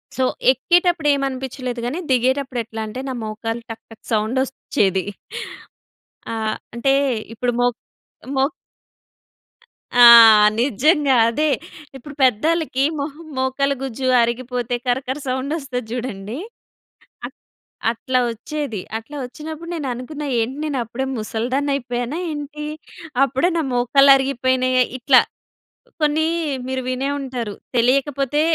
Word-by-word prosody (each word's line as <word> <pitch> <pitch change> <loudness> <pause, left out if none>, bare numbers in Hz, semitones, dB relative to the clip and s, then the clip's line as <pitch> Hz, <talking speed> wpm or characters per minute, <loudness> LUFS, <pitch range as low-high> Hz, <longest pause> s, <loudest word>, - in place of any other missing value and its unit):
So 260 - 0 0.3
ఎక్కేటప్పుడు 345 +3 +2
ఏమనిపించలేదు. 260 -2 -3
కానీ 290 +9 -2
దిగేటప్పుడు 260 0 +1
ఎట్లా 225 0 -7
అంటే 250 +4 -6
నా - - -3
మోకాలు 225 +2 -4
టక్ 225 0 -9
టక్ 225 - -15
సౌండ్ 220 +4 +1
ఒచ్చేది. 195 -8 -1 1.3
ఆ! - - -2 0.4
అంటే 270 +3 +2 0.4
ఇప్పుడు 245 +1 -1
మో 245 - +4 0.7
మో 265 - +4 1.5
ఆ! 245 0 +7 0.6
నిజంగా 280 - +3
అదే. 300 +6 +1 0.5
ఇప్పుడు 280 +2 -11
పెద్దోళ్ళకి 275 +3 +2 0.2
మొహ 280 +1 -3 0.2
మోకల 265 +2 0
గుజ్జు 260 0 -3
అరిగిపోతే 245 0 -1
కరకర 260 +2 -1
సౌండ్ 260 +3 -2
ఒస్తది 250 -5 -5
చూడండి. 230 -2 -5 0.9
అట్ట - - -13 0.6
అట్లా 255 +2 -1
వచ్చేది. 230 -3 -5 0.2
అట్లా 225 +7 -9
వచ్చినప్పుడు 315 +5 -8
నేను 295 -5 -4
అనుకున్నా 290 +4 -6
ఏంటి, 250 +5 -2
నేను 285 -3 -2
అప్పుడే 240 +4 -4
ముసలిదాన్ని 250 +6 -2
అయిపోయానా 245 +2 -3
ఏంటి. 300 0 -6 0.6
అప్పుడే 275 +6 +1
నా - - +2
మోకళ్ళు 275 +3 +5
అరిగిపోయినాయా 255 -1 +1
ఇట్లా 255 +1 +6 0.8
కొన్ని 300 +1 +2 0.4
మీరు 260 0 -2
వినే 260 +2 -1
ఉంటారు 250 -6 -4 0.2
తెలియకపోతే, 275 +3 +2
260 Hz, 115 wpm, -21 LUFS, 240-280 Hz, 1.5 s, ఆ